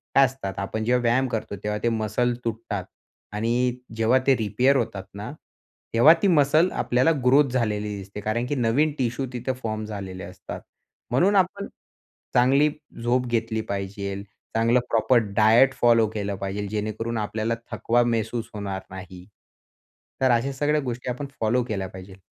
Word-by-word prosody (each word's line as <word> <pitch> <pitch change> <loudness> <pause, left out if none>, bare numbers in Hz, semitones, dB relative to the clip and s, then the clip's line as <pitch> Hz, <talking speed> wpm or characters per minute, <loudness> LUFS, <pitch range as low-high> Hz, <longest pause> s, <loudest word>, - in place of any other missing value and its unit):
काय 135 - +7
असतात 125 -7 -5
आपण 110 +3 -3
जेव्हा 125 +2 +2
व्यायाम 120 +3 +2
करतो, 110 -4 -4
तेव्हा 105 0 -1
ते 120 - +3
मसल 115 +2 0
तुटतात 110 -4 -3 0.5
आणि 110 +2 -1 0.4
जेव्हा 115 +4 +3
ते 135 - +6
रिपेअर 120 +5 +2
होतात 100 -6 -2
ना, 100 +6 -6 0.6
तेव्हा 130 +8 +8
ती - - +3
मसल 155 +1 +4
आपल्याला 125 +6 +2
ग्रोथ 140 +2 +5
झालेली 105 -4 -1
दिसते, 100 +1 -8
कारण 110 +4 -1
की 145 - -1
नवीन 130 +6 +2
टिशू 125 +1 -1
तिथं 125 +2 -2
फॉर्म 110 -1 -3
झालेले 95 -3 -6
असतात - - -8 0.5
म्हणून 185 +11 +3
आपण 195 +1 +1 0.7
चांगली 135 +5 +4 0.3
झोप 125 +1 +2
घेतली 115 -1 -1
पाहिजेल, 100 0 -4 0.3
चांगलं 115 +2 +3
प्रॉपर 120 +2 +4 0.2
डायट 115 +5 +5
फॉलो 115 -2 +5
केलं 100 -2 -3
पाहिजेल, 100 +1 -4
जेणेकरून 110 +2 -3
आपल्याला 110 +2 -1 0.2
थकवा 120 +1 +2
महसूस 115 0 -1
होणार 100 -2 -4
नाही. 95 -1 -10 1.0
तर 130 -1 +4
अशा 120 +4 +1
सगळ्या 150 +2 +1
गोष्टी 125 -1 -4
आपण 125 +4 -3
फॉलो 115 +3 +2
केल्या 100 -5 -3
पाहिजेल. 95 +1 -11
115 Hz, 155 wpm, -24 LUFS, 105-125 Hz, 1.0 s, तेव्हा